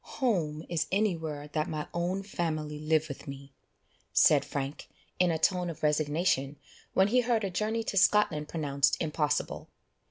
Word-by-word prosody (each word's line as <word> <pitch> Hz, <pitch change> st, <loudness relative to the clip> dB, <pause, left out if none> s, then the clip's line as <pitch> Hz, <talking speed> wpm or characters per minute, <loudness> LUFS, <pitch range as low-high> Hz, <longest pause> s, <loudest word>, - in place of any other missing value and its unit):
"Home 165 Hz, -, 0 dB
is 170 Hz, -2 st, -1 dB
anywhere 160 Hz, -8 st, -1 dB
that 155 Hz, +1 st, -1 dB
my 155 Hz, -1 st, -4 dB
own 180 Hz, +3 st, -1 dB
family 155 Hz, -6 st, -3 dB
live 155 Hz, +1 st, +1 dB
with 140 Hz, -1 st, -8 dB
me," 135 Hz, 0 st, -9 dB, 0.6 s
said -, -, +5 dB
Frank 140 Hz, +1 st, -5 dB, 0.3 s
in 180 Hz, -1 st, +4 dB
a 165 Hz, -, +1 dB
tone 180 Hz, +2 st, +1 dB
of 160 Hz, -, -8 dB
resignation, 150 Hz, -1 st, +1 dB, 0.4 s
when 190 Hz, +1 st, +4 dB
he 250 Hz, +3 st, +4 dB
heard 235 Hz, -2 st, +1 dB
a 195 Hz, -, -2 dB
journey 220 Hz, +4 st, -1 dB
to 205 Hz, -, -3 dB
Scotland 180 Hz, -7 st, +3 dB
pronounced 140 Hz, -3 st, +1 dB
impossible. 150 Hz, -2 st, -1 dB
160 Hz, 155 wpm, -29 LUFS, 150-190 Hz, 0.6 s, said